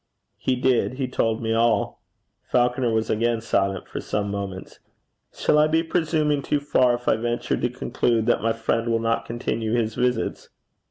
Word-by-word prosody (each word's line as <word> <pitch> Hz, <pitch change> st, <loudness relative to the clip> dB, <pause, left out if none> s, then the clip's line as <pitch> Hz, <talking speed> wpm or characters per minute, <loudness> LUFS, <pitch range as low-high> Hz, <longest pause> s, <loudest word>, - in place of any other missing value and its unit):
'He 130 Hz, -, 0 dB
did. 125 Hz, 0 st, +1 dB
He 130 Hz, 0 st, -2 dB
told 115 Hz, -2 st, -1 dB
me 110 Hz, 0 st, 0 dB
all.' 115 Hz, 0 st, +1 dB, 0.4 s
Falconer 125 Hz, 0 st, +1 dB
was 110 Hz, 0 st, 0 dB
again 115 Hz, +1 st, +1 dB
silent 95 Hz, -4 st, -1 dB
for -, -, -5 dB
some 100 Hz, -1 st, -2 dB
moments. 100 Hz, -2 st, -6 dB, 0.5 s
'Shall 150 Hz, -, +2 dB
I 150 Hz, -, +5 dB
be 160 Hz, +1 st, +2 dB
presuming 155 Hz, -3 st, +1 dB
too 145 Hz, -, 0 dB
far 130 Hz, -3 st, +3 dB
if 120 Hz, 0 st, -10 dB
I -, -, +4 dB
venture 120 Hz, +1 st, -1 dB
to 120 Hz, -, -1 dB
conclude 120 Hz, -2 st, 0 dB
that -, -, +2 dB
my 115 Hz, +1 st, +1 dB
friend 115 Hz, +1 st, -1 dB
will 115 Hz, 0 st, +2 dB
not 115 Hz, 0 st, 0 dB
continue 115 Hz, -1 st, -2 dB
his 115 Hz, -2 st, 0 dB
visits?' 125 Hz, +1 st, -1 dB
120 Hz, 175 wpm, -24 LUFS, 110-130 Hz, 0.5 s, I